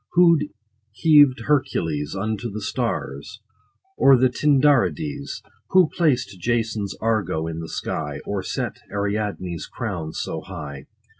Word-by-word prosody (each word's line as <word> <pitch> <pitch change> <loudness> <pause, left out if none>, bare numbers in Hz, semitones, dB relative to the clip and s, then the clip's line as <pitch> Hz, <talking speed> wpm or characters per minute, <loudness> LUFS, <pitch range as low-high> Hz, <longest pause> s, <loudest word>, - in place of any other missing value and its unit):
Who 170 -2 +6 0.6
heav'd 145 -4 +6
Hercules 80 - 0
Unto 110 +3 -2
the 105 +1 -5
stars, 110 - -3 0.6
or 135 -1 +6
the 130 +1 +4
Tindarides? 145 +1 +1 0.3
Who 185 -4 +5
placed 125 - +1
Jason's 110 -2 -1
Argo 110 -8 0
in 80 0 -4
the 80 - -6
sky, 75 - -3
50 - - -7
Or 100 -2 -2
set - - -3 0.2
bright - - -9
Ariadne's 100 -4 -2
crown 90 -10 -4
so - - -4
high 70 -2 -8
110 Hz, 130 wpm, -23 LUFS, 95-140 Hz, 0.6 s, Who